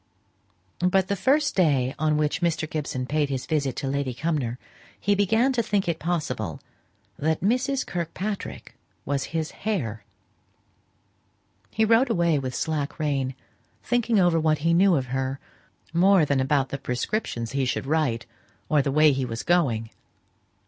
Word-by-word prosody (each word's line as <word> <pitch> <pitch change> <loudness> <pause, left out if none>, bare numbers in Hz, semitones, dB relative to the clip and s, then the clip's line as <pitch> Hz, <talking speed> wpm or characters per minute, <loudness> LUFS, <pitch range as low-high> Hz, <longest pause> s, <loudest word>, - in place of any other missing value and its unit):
But 185 +1 +2
the 200 - +1
first 290 +8 +2
day 140 -8 +2
on 155 -1 +2
which 150 +3 0
Mr. 165 -2 0
Gibson 145 -5 -3
paid 150 +1 0
his 130 -2 -3
visit 140 -4 -1
to 140 - -3
Lady 135 -2 -2
Cumnor, 140 -5 -1 0.4
he 205 - +2
began 220 +6 +2
to 245 - +2
think 205 -4 0
it 170 -1 -1
possible 130 - -2 0.6
that 160 +2 0
Mrs. 255 +6 +1
Kirkpatrick 185 +4 -5 0.3
was 140 -1 -1
his 160 -1 -3
"hare." 130 - -3 1.7
He 220 - +1
rode 230 +4 +4
away 170 -8 +2
with 130 -2 -4
slack 155 -2 -2
rein, 135 -4 -1 0.5
thinking 235 -3 +1
over 175 -3 +4
what 155 -1 +2
he 170 - +4
knew 185 +1 +5
of 135 -3 0
her, 135 0 -2 0.5
more 180 0 +5
than 140 -2 +1
about 135 0 +1
the 140 - -4
prescriptions 125 - -2
he 135 -1 0
should 125 - -2
write, 135 -6 0 0.4
or 150 -2 +4
the 140 - -1
way 155 +1 +5
he 135 -1 -1
was 115 -2 -4
going. 125 -11 +1
155 Hz, 155 wpm, -25 LUFS, 135-185 Hz, 1.7 s, knew